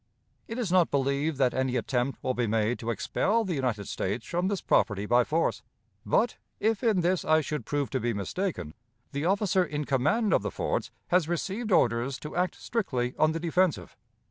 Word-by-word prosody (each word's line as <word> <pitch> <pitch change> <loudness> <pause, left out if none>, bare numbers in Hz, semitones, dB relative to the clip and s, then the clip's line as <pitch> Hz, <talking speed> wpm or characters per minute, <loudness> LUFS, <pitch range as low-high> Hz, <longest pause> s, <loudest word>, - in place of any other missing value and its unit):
It 225 - -5
is 230 -8 -2
not 180 -2 +4
believed 140 +2 0
that 130 -2 +2
any 130 -1 0
attempt 125 +2 -1
will 130 - 0
be 120 -2 0
made 110 +2 +1
to 115 - -4
expel 220 - +1
the 185 - -2
United 125 - -1
States - - -3
from 175 +2 -1
this 200 -1 -1
property 100 -2 +1
by 120 +3 +4
force; 160 +4 0 0.5
but, 240 - +2 0.2
if 220 +1 +1
in 215 -6 +3
this 180 +1 +1
I 155 0 +4
should 150 0 -4
prove 145 -2 -1
to 130 - 0
be 120 0 0
mistaken, 100 - -3 0.4
the 140 +3 -2
officer 195 0 +2
in 150 -3 -3
command 155 - +2
of - - +4
the - - -2
forts - - -2 0.2
has 175 -3 +3
received 200 +6 -2
orders 125 -4 +2
to 150 - -7
act 180 0 0
strictly 130 - -2
on 155 0 +4
the 165 - -2
defensive. 165 - 0
150 Hz, 195 wpm, -28 LUFS, 125-185 Hz, 0.5 s, not